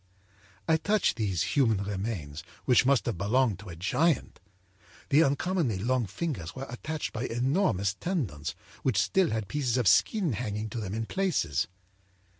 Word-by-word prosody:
âI 160 0 +3
touched 210 +2 +2
these 100 -8 -1
human 115 -8 +3
remains, 95 -7 -4 0.2
which 125 0 +4
must 140 -2 +3
have 115 -8 -2
belonged 110 0 +2
to 105 -2 -10
a 85 - -7
giant. 140 - 0 0.7
The 155 +2 +6
uncommonly 145 - 0
long 120 +3 0
fingers 100 - -4
were 135 +1 -5
attached 155 +5 -4
by 115 +2 -3
enormous 120 - +1
tendons 100 - -3 0.3
which 130 -7 +1
still 190 -4 +2
had 110 -2 -2
pieces 130 -3 0
of 120 -5 +1
skin 180 - +3
hanging 105 -1 -3
to 120 - -4
them 105 -1 -4
in 115 0 -2
places. 110 - 0
120 Hz, 155 wpm, -29 LUFS, 100-145 Hz, 0.7 s, The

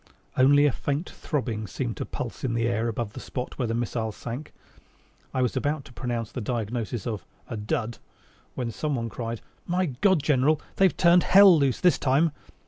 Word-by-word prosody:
Only 145 +3 +6
a 145 - +4
faint 145 +7 -3
throbbing 115 - -3
seemed 120 0 -3
to - - -4
pulse 120 - -6
in 120 -3 0
the 115 0 +1
air 115 0 0
above 115 -2 -3
the - - -7
spot 125 +1 -6
where 125 - 0
the 115 - -1
missile 115 -1 -2
sank. 120 +7 -7 0.8
I 130 - 0
was 125 - 0
about 145 -1 -1
to 125 - -14
pronounce 120 -3 -3
the 125 - -4
diagnosis 115 0 -3
of 110 -5 -3 0.2
"a - - -5
dud," 110 +2 -2 0.6
when 120 -2 -2
someone 125 -3 -2
cried, 115 0 -5 0.3
"My 180 +1 +1
God, 160 +3 +2
General, 145 +1 +3 0.2
they've 190 -2 +4
turned 175 0 +6
hell 195 -1 +8
loose 140 -5 +2
this 180 - +4
time!" 145 +4 +3
125 Hz, 185 wpm, -26 LUFS, 115-145 Hz, 0.8 s, hell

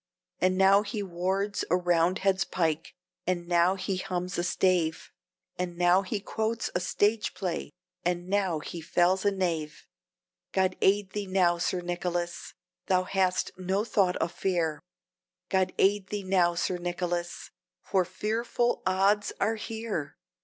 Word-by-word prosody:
And 185 0 +2
now 195 +1 +6
he 210 0 -4
wards 190 +3 -1
a 180 - +4
Roundhead's 180 +2 +2
pike, 165 -4 -1 0.3
and 175 -1 -1
now 175 +2 +3
he 190 0 -2
hums 180 0 -3
a - - 0
stave, 175 -2 +1 0.5
And 175 -1 -3
now 175 +2 +4
he 200 +2 -3
quotes 220 +3 -2
a - - +1
stage 205 +4 +1
play, 180 -3 -3 0.3
and 175 0 -1
now 190 -4 +1
he 170 +3 -7
fells 180 +4 +2
a - - +6
knave. 170 -5 -2 0.7
God 185 -1 +2
aid 195 0 +3
thee 205 -1 -4
now, 180 -2 +2
Sir 180 +1 0
Nicholas! 175 0 -3 0.3
thou 185 -1 +3
hast 185 -1 0
no 190 +3 0
thought 195 -6 +2
of 165 - -1
fear; 170 -5 -1 0.7
God 190 -1 +2
aid 195 0 +3
thee 205 0 -4
now, 180 -2 +2
Sir 180 +1 -1
Nicholas! 175 0 -3 0.3
for 190 -2 +2
fearful 225 +6 -1
odds 195 +2 +2
are 220 +3 +2
here! 220 -8 -4
185 Hz, 145 wpm, -28 LUFS, 175-195 Hz, 0.7 s, now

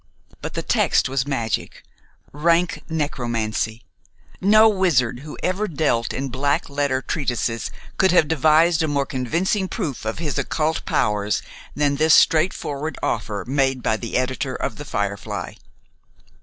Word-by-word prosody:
But - - -6
the - - -2
text - - +2
was 135 0 -1
magic, 115 -6 -2 0.5
rank 165 +4 +1
necromancy. 120 -7 -2 0.6
No 215 +3 +6
wizard 170 - +2
who 150 +2 -9
ever 190 +4 0
dealt 140 - 0
in 135 0 -3
black 140 +3 -1
letter 140 -2 0
treatises 120 -6 -2 0.3
could 190 -1 +5
have 175 -4 +4
devised 160 +2 +4
a 160 - +1
more 140 -2 0
convincing 170 - -1
proof 170 - -4
of 110 0 -3
his 155 -2 -2
occult 160 0 -1
powers 105 0 0 0.3
than 145 -1 +1
this 155 +1 +5
straightforward 155 -3 +2
offer 105 -4 -2
made 135 -2 +1
by 110 - +2
the 115 +1 -3
editor 130 +1 -2
of 120 - -3
"The 145 - -7
Firefly." 100 -6 -3
140 Hz, 140 wpm, -22 LUFS, 120-160 Hz, 0.6 s, No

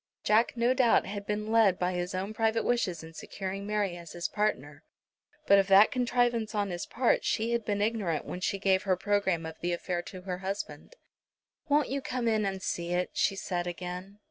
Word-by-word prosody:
Jack 225 +3 +3
no 240 +2 +3
doubt 255 -3 +4
had 200 +1 -6
been 210 +1 -2
led 220 -5 +4
by 180 0 0
his 180 +1 -3
own 195 +3 -3
private 225 0 +1
wishes 185 -9 0
in 160 0 -11
securing 195 +3 -6
Mary 205 -4 0
as 170 -1 -10
his 175 0 -2
partner, 145 -9 -2 0.6
but 200 0 +6
of 195 - +2
that 195 +2 +7
contrivance 245 -3 +1
on 200 -2 0
his 175 0 -4
part 245 -1 +1
she 225 +2 0
had 235 -1 0
been 205 -1 0
ignorant 205 -8 -1
when 180 - -5
she 195 - 0
gave 190 -1 +2
her 190 -3 +1
programme 190 -4 0
of 160 0 -8
the 175 0 -1
affair 175 0 -2
to 185 +1 -10
her 180 -1 -4
husband. 195 - -5 0.7
"Won't 290 -1 +3
you 275 +2 -2
come 250 -2 -2
in 215 -2 +2
and 190 -1 -4
see 170 0 -2
it?" 180 +1 0
she 195 - +1
said 180 -2 -3
again. 180 +3 -6
200 Hz, 205 wpm, -29 LUFS, 180-220 Hz, 0.7 s, that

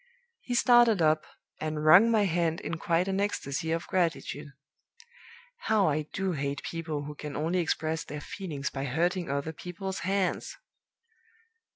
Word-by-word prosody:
He 245 - -4
started 240 -4 +5
up, 155 -1 +3 0.3
and 155 -1 -3
wrung 185 +9 +8
my 220 -2 +3
hand 170 -3 0
in 165 - -4
quite 170 +2 +1
an 195 0 0
ecstasy 160 -6 -2
of 165 +1 -1
gratitude. 165 -4 -1 1.2
How 210 -3 +4
I 150 0 -1
do 190 -1 -1
hate 140 -3 -3
people 160 -3 -4
who 150 +1 -6
can 150 -1 -7
only 165 +5 0
express 160 -1 -1
their 150 - -7
feelings 145 -5 -5
by 135 0 -4
hurting 175 +6 0
other 140 +3 -2
people's 185 +4 -6
hands! 190 0 -1
165 Hz, 150 wpm, -29 LUFS, 150-190 Hz, 1.2 s, wrung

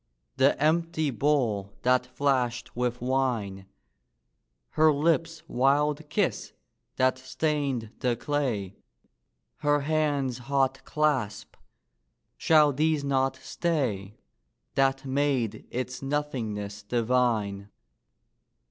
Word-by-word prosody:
The 135 +1 +3
empty 160 0 +1
bowl 115 -7 0
that 125 0 +3
flashed 125 -2 -1
with 125 0 -1
wine! 120 -7 -1 1.0
Her 155 0 +4
lips' 165 +2 0
wild 145 +3 +1
kiss, 155 - -1 0.4
that 130 0 +2
stained 135 -4 -2
the 125 -2 +1
clay, 120 -8 -2 0.8
Her 145 -1 +2
hands' 145 -4 0
hot 135 +1 0
clasp 135 -9 -1 0.8
shall 150 -3 +4
these 155 +1 +1
not 135 -1 +1
stay, 130 - -2 0.6
That 135 0 +1
made 130 -5 -1
its 125 0 -4
nothingness 115 -8 -3
divine? 110 -3 0
135 Hz, 90 wpm, -27 LUFS, 120-145 Hz, 1.0 s, Her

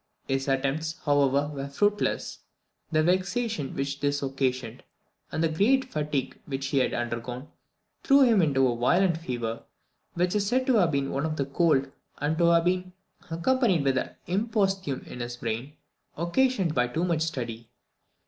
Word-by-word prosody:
His 135 0 -1
attempts, 140 +4 -1
however, 145 0 +2
were 140 -1 -4
fruitless. 205 +9 0 0.5
The 155 -1 +3
vexation 185 - 0
which 140 +1 -3
this 145 0 0
occasioned, 130 -3 -2 0.5
and 160 - -1
the - - +4
great 220 +12 +2
fatigue 150 -3 -2
which 135 -1 -3
he 140 - +2
had 130 - +1
undergone, 120 +3 -4 0.5
threw 275 +1 +5
him 230 -6 +5
into 135 -5 +3
a 120 - 0
violent 170 +8 +2
fever, 120 -7 -4 0.5
which 180 +1 +1
is 205 -1 +1
said 255 +4 +1
to 255 -3 +3
have 180 -5 +4
been 140 -1 -1
one 140 +3 -1
of 140 -3 -3
cold, 140 -5 +2 0.3
and 150 +2 0
to 170 - +4
have 170 0 +4
been 180 0 0 0.4
accompanied 185 - +2
with 135 -1 +2
an - - -4 0.2
imposthume 195 - 0
in - - -9
his 120 0 -5
brain, 120 +5 -4 0.4
occasioned 185 - +1
by 125 -3 +2
too 160 +8 -2
much 170 -3 0
study. 120 -7 -4
150 Hz, 160 wpm, -27 LUFS, 135-180 Hz, 0.5 s, threw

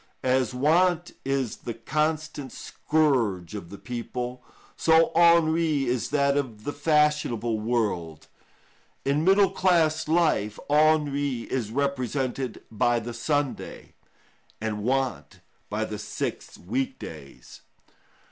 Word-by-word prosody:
As 130 -2 +2
want 170 +6 +2
is 135 -4 -1
the 120 - -6
constant 150 +2 -2
scourge 120 - 0
of 100 -5 -7
the 100 - -9
people, 125 +1 -5 0.3
so 160 0 +4
ennui 165 -3 +4
is 125 -1 -1
that 140 -1 +2
of 120 -7 -3
the 145 - -3
fashionable 150 -7 +1
world. 105 -9 -2 0.8
In 140 +3 +1
middle 195 +2 +5
class 160 -4 +2
life 155 -11 +1
ennui 145 -4 +2
is 120 -5 -1
represented 130 -1 -2
by 120 +2 +2
the 120 +1 -6
Sunday, 145 +3 -3 0.7
and 105 -1 -3
want 130 +2 -1 0.3
by - - -1
the - - -6
six - - -5
week 130 +8 -3
days. 70 -6 -11
135 Hz, 110 wpm, -26 LUFS, 115-155 Hz, 0.8 s, middle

